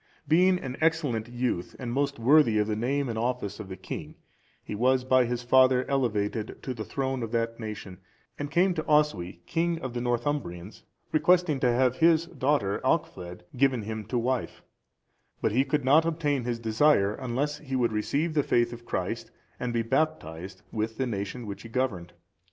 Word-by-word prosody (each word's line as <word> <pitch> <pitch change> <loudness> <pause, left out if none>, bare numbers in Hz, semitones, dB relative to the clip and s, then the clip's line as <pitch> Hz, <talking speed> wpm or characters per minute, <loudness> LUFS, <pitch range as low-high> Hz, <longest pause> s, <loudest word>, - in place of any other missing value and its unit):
Being 180 +4 +4
an 130 -6 -6
excellent 145 -9 +1
youth, 120 -7 -2
and 120 -3 -4
most 140 +1 0
worthy 120 -1 +5
of 105 - +3
the 105 0 -1
name 135 +5 0
and 115 -2 -3
office 120 -4 -2
of 105 -3 -7
a 95 - -5
king, - - -7 0.5
he - - -6
was 125 +4 +2
by 130 -1 +4
his 120 +1 -3
father 130 +1 +5
elevated 110 -5 -1
to 130 - -3
the 110 -3 -5
throne 130 +1 -2
of 115 -1 -4
that 115 0 -1
nation, 105 -4 -7 0.4
and 145 0 -3
came 180 +4 +3
to 160 -2 -3
Oswy, 100 - +1
king 170 +1 0
of 130 -6 -5
the 120 - -3
Northumbrians, 120 -7 -2 0.3
requesting 170 -2 +3
to 125 -2 +3
have 125 +1 +2
his 165 0 +4
daughter 140 - 0
Alchfled(401) 90 0 -1
given 130 -2 +2
him 110 +1 -4
to 120 +4 -2
wife; 125 +1 -2 0.8
but - - +1
he 125 +5 +3
could 140 0 -1
not 150 +5 +6
obtain 150 -6 -1
his 120 -1 -1
desire 110 -2 +3
unless 135 +4 -2
he 135 -3 -5
would 120 -3 +2
receive 145 +10 -1
the 150 - +3
faith 120 -3 +1
of 120 0 -11
Christ, - - -3 0.3
and 125 - -2
be 115 -1 0
baptized, 95 - -2
with 110 0 -3
the 130 - 0
nation 110 +1 -4
which 100 -1 -6
he 115 - -10
governed. 105 -9 -2
125 Hz, 185 wpm, -27 LUFS, 110-145 Hz, 0.8 s, not